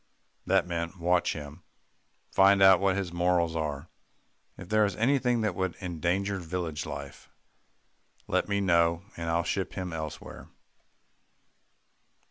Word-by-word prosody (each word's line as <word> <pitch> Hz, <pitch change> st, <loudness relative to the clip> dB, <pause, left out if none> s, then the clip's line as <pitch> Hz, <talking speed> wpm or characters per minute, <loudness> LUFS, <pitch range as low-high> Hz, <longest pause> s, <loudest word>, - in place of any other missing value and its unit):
That -, -, +3 dB
meant, 85 Hz, +1 st, -4 dB
"Watch 90 Hz, +1 st, +2 dB
him 75 Hz, +2 st, -9 dB, 0.7 s
find 100 Hz, +1 st, +5 dB
out 95 Hz, -2 st, +8 dB
what 95 Hz, -1 st, +2 dB
his 95 Hz, -3 st, -3 dB
morals 85 Hz, -1 st, +1 dB
are. 75 Hz, -1 st, -3 dB, 0.7 s
If 95 Hz, -, -10 dB
there's 105 Hz, -1 st, +2 dB
anything 125 Hz, 0 st, +2 dB
that 110 Hz, -3 st, 0 dB
would 95 Hz, 0 st, -2 dB
endanger 95 Hz, +2 st, -1 dB
village 85 Hz, -3 st, -4 dB
life, -, -, -8 dB, 1.0 s
let -, -, 0 dB
me 100 Hz, 0 st, +1 dB
know, 85 Hz, -2 st, +2 dB
and 85 Hz, -1 st, -4 dB
I'll 85 Hz, +1 st, +1 dB
ship 95 Hz, +2 st, -2 dB
him 90 Hz, -3 st, -5 dB
elsewhere." 80 Hz, -2 st, -7 dB
90 Hz, 125 wpm, -28 LUFS, 85-95 Hz, 1.0 s, out